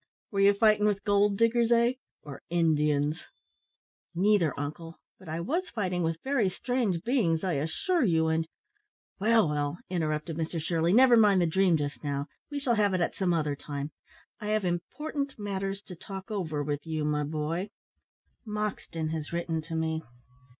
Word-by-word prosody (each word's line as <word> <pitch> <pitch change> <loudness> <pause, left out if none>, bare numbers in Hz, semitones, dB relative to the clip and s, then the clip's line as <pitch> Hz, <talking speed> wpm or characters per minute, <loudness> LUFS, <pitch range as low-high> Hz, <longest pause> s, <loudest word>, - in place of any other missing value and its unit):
Were 200 - -1
you 200 +1 +6
fighting 210 0 +4
with 200 -2 0
gold 205 0 +3
diggers, 230 +1 +3
eh! 235 +1 +4 0.3
or 140 -2 -9
Indians?" 150 -3 +1 0.9
"Neither, 180 -6 +2
uncle; 165 +3 -6 0.2
but 185 -4 -12
I 160 +1 -3
was 335 - -1
fighting 185 -5 -2
with 165 -1 -1
very 265 -7 +2
strange 210 -5 -1
beings, 195 -10 +1
I 185 -2 0
assure 160 - 0
you, 160 -6 +3
and 160 0 0 0.4
" 420 - -54
"Well, 225 -2 +4
well," 145 +1 -1
interrupted 155 -2 -2
Mr 165 +1 -2
Shirley, 165 +1 +1
"never 245 +3 +7
mind 210 -4 +5
the 175 - +3
dream 180 0 +3
just 145 -4 -4
now; 140 -1 -2 0.2
we 290 - -4
shall 275 -4 +1
have 205 -3 +2
it 180 - 0
at 170 - 0
some 185 -2 0
other 150 -4 0
time. 145 +1 -5 0.5
I 210 - -5
have 215 -2 +1
important 275 - -3
matters 195 -1 -3
to 180 - -10
talk 195 +4 -8
over 160 -8 -2
with 145 0 -3
you, 155 -1 -1
my 150 0 0
boy. 155 +6 -2 0.7
Morton 210 -7 -3
has 155 -2 -4
written 170 -1 -2
to 165 +1 -6
me. 160 0 -1
175 Hz, 170 wpm, -29 LUFS, 160-210 Hz, 0.9 s, never